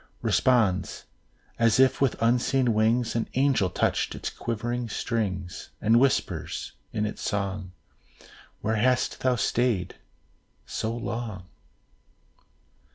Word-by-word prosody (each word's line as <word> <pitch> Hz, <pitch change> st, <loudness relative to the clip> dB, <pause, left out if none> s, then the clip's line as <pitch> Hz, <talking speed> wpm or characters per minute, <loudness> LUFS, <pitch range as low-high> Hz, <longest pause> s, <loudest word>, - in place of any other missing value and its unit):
Responds, 110 Hz, -8 st, +2 dB, 0.5 s
as 115 Hz, 0 st, +4 dB
if 130 Hz, 0 st, +4 dB
with 135 Hz, -3 st, +2 dB
unseen 125 Hz, +1 st, +2 dB
wings, 115 Hz, +2 st, +2 dB
An 115 Hz, -, -1 dB
angel 130 Hz, -8 st, +3 dB
touched -, -, 0 dB
its -, -, -4 dB
quivering 120 Hz, +1 st, -3 dB
strings; 95 Hz, -6 st, -3 dB
And 115 Hz, +2 st, +4 dB
whispers, 85 Hz, -, 0 dB, 0.2 s
in 105 Hz, -, -1 dB
its 105 Hz, -, -5 dB
song, 100 Hz, -2 st, -2 dB, 0.9 s
"'Where 110 Hz, +1 st, 0 dB
hast 125 Hz, +3 st, +1 dB
thou 130 Hz, -1 st, +2 dB
stayed 115 Hz, -6 st, 0 dB, 0.7 s
so 110 Hz, -, -3 dB
long?" 115 Hz, -4 st, -4 dB
115 Hz, 105 wpm, -26 LUFS, 100-125 Hz, 0.9 s, as